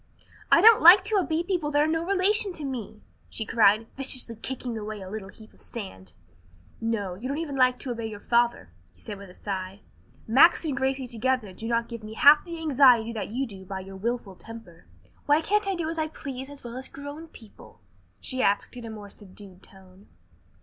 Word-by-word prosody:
"I - - +7
don't 450 0 +8
like 360 +4 +9
to 425 +1 0
obey 330 -2 -1
people 345 -5 -2
that 290 0 +2
are - - +2
no 325 +1 0
relation 395 +2 +1
to 305 -4 -6
me!" 230 -5 -6 0.3
she 220 - -5
cried, 215 -1 +3
viciously 255 -3 -1
kicking 245 +1 -5
away 215 -1 -6
a 190 -1 -9
little 210 -3 -6
heap 220 +2 -16
of - - -20
sand. 190 - -9 0.7
"No, 220 -5 -2
you 210 +8 -7
don't 280 +2 -3
even 310 -4 -4
like 255 -1 +3
to 255 - -4
obey 230 -1 -4
your 210 -2 -8
father," 235 - 0 0.2
he - - -27
said 200 - -8
with 200 -1 -11
a 180 - -15
sigh. 195 0 -6 0.4
"Max 275 +9 +5
and 290 -4 -1
Gracie 265 0 -1
together 240 -3 -2
do 225 +5 -7
not 235 0 0
give 235 -2 -8
me 215 +1 -9
half 290 +5 +7
the 340 -1 -7
anxiety 260 -7 +4
that 220 - -5
you 255 +5 -2
do 195 -5 -11
by 190 0 -6
your 195 +1 -11
wilful 225 -1 -4
temper." 225 -6 -13 0.4
"Why, 295 +1 +5
can't 415 +5 0
I 390 - 0
do 335 -3 -3
as 325 0 -4
I 315 - 0
please 270 -3 -8
as 285 -1 -11
well 240 0 -7
as 260 - -5
grown 285 +3 -9
people?" 225 -9 -16 0.4
she 255 -1 -4
asked 200 +3 0
in 240 -2 -8
a - - -7
more 210 -2 -10
subdued 195 -2 -14
tone. 190 0 -17
240 Hz, 210 wpm, -26 LUFS, 210-290 Hz, 0.7 s, like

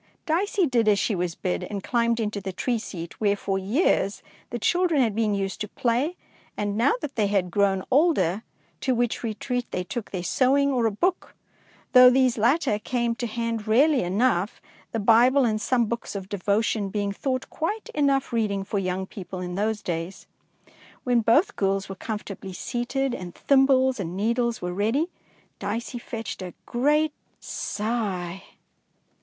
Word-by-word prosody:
Dicey 375 +4 +1
did 240 -6 +1
as 210 -1 +5
she 210 - 0
was 175 -2 -2
bid, 90 -1 -2
and 200 -2 -5
climbed 235 -1 +1
into 210 -2 -2
the 190 0 -4
tree 235 +5 -1
seat 170 -5 -8
where 205 -1 +3
for 195 -1 -2
years 200 - +1 0.3
the 240 - -3
children 345 - +2
had 230 -5 +2
been 215 -1 +1
used 195 +1 -3
to 210 - -2
play, 250 - 0 0.4
and, 205 -1 -1
now 235 - +3
that 280 - -5
they 215 -3 +2
had 195 -3 0
grown 195 -1 +2
older, 250 - +3 0.4
to 260 -2 0
which 240 0 0
retreat 245 +2 -3
they 180 - -2
took 215 +4 -5
their 185 -3 -4
sewing 275 +7 +3
or 245 -4 +2
a - - 0
book, 355 - -1 0.6
though 250 -1 +10
these 255 -1 +3
latter 240 0 +2
came 235 +1 -1
to 240 +1 -3
hand 230 -1 -3
rarely 270 +5 +4
enough, 195 +1 +1 0.3
the - - -2
Bible 240 +5 +5
and 215 -2 0
some 245 -1 +2
books 230 -1 -4
of 195 -1 -6
devotion 205 +1 0
being 205 0 -1
thought 255 +5 -2
quite 410 +8 -3
enough 275 -3 +1
reading 205 -4 0
for 200 +1 -2
young 185 0 -2
people 185 -2 -8
in 180 0 -4
those 210 +3 -1
days. 170 +2 -4 0.8
When 245 -2 +3
both 295 - +3
girls 195 0 0
were - - -4
comfortably 200 -2 -6
seated 250 +6 -2
and 180 -6 -6
thimbles 265 -2 +3
and 180 -1 -4
needles 235 +1 0
were 180 0 -2
ready, 230 - 0 0.5
Dicey 230 +4 -3
fetched 225 -5 -6
a 180 -1 -7
great 295 +5 +2 0.3
sigh. 200 -5 -3
225 Hz, 170 wpm, -25 LUFS, 195-255 Hz, 0.8 s, though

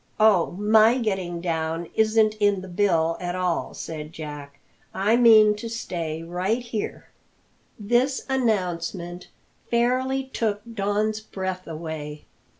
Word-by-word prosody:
"Oh, 210 -7 +4
my 220 +3 +5
getting 190 -7 -2
down 165 -1 -2
isn't 220 0 +3
in 205 -2 +2
the 190 - -9
bill 175 -3 +1
at 175 0 -3
all," 180 -2 -1
said 155 -1 -6
Jack; 145 -2 -8 0.4
"I 205 +4 +3
mean 220 -3 +7
to 230 +2 -6
stay 165 -8 -4
right 185 +8 -1
here." 230 -3 -5 0.7
This 240 +6 +1
announcement 180 -8 -1 0.4
fairly 255 +3 +1
took 220 -5 -2
Don's 210 +1 0
breath 190 -3 -5
away. 155 -2 -6
195 Hz, 120 wpm, -24 LUFS, 170-220 Hz, 0.7 s, mean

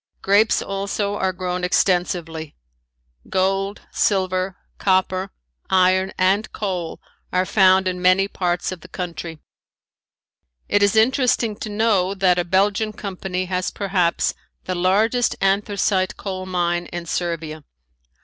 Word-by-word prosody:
Grapes 205 +3 +3
also 200 +1 -2
are 190 -2 0
grown 180 0 -4
extensively. 175 -4 0 0.7
Gold, 195 +2 0
silver, 185 -1 0 0.2
copper, 190 0 +1 0.4
iron 185 0 +3
and 195 +3 +2
coal 180 -5 -4 0.3
are 185 +1 +1
found 190 -1 +4
in 180 -1 -2
many 185 +2 +4
parts 175 -3 -1
of 185 -3 -7
the - - -12
country. 170 -2 -6 1.3
It 205 - +2
is 205 +1 +3
interesting 235 -1 +2
to 215 - -6
know 205 -3 +1
that 185 -2 +3
a - - +1
Belgian 200 +4 +1
company 190 -3 -4
has 180 0 -1
perhaps 185 -4 0 0.3
the 185 - -3
largest 210 +7 +2
anthracite 195 -1 +1
coal 185 -2 -5
mine 175 -1 -1
in 175 0 -6
Servia. 160 -2 -3
185 Hz, 120 wpm, -21 LUFS, 180-200 Hz, 1.3 s, found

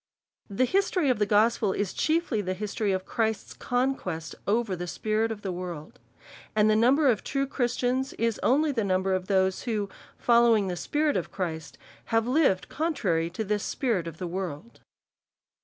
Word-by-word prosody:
The 205 +6 +1
history 370 - +2
of 240 - -1
the 210 - +2
gospel 215 -1 +3
is 205 -3 -2
chiefly 315 -8 0
the 185 -1 -3
history 210 +1 -2
of 185 0 -2
Christ's 220 -2 -2
conquest 245 -10 -2
over 215 -1 +1
this 175 0 -5
spirit 220 +1 0
of 210 -2 -6
the 190 - -2
world. 175 -4 -7 0.6
And 215 0 +4
the 215 - +4
number 265 +7 +4
of 230 -6 +2
true 275 0 -1
Christians, 255 0 -1
is 230 -2 -1
only 295 +4 +3
the 230 -5 -1
number 190 0 +1
of 185 0 -2
those 190 -1 +2
who, 210 -4 -1 0.3
following 235 -4 +4
the 180 - -2
Spirit 295 - 0
of - - -4
Christ, 160 -4 -4 0.3
have 225 -1 +1
lived 255 - +2
contrary 195 - 0
to 185 +6 -4
the 210 0 0
spirit 215 - -1
of 165 -1 -7
the 180 - -4
world. 180 +2 -5
215 Hz, 175 wpm, -27 LUFS, 185-250 Hz, 0.6 s, And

